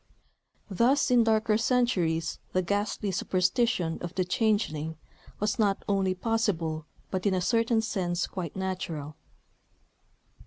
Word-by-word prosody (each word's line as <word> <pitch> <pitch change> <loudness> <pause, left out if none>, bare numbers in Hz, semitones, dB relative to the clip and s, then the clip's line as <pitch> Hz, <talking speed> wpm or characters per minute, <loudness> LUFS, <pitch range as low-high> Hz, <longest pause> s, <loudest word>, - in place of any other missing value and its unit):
(Thus, 240 +8 +2
in 245 -2 +6
darker 220 -1 +2
centuries, 190 -10 +1
the 185 - +2
ghastly 205 +1 -1
superstition 185 -1 +1
of 175 0 -6
the 185 - +1
"changeling," 175 -6 0 0.4
was 210 +2 -1
not 200 -2 +2
only 195 -2 +1
possible, 180 -8 -1 0.2
but 185 +1 -1
in 190 - +2
a - - +1
certain 230 +3 +2
sense 180 -5 -1
quite 175 -5 -6
natural.) 175 -6 -4
190 Hz, 120 wpm, -28 LUFS, 175-225 Hz, 0.4 s, in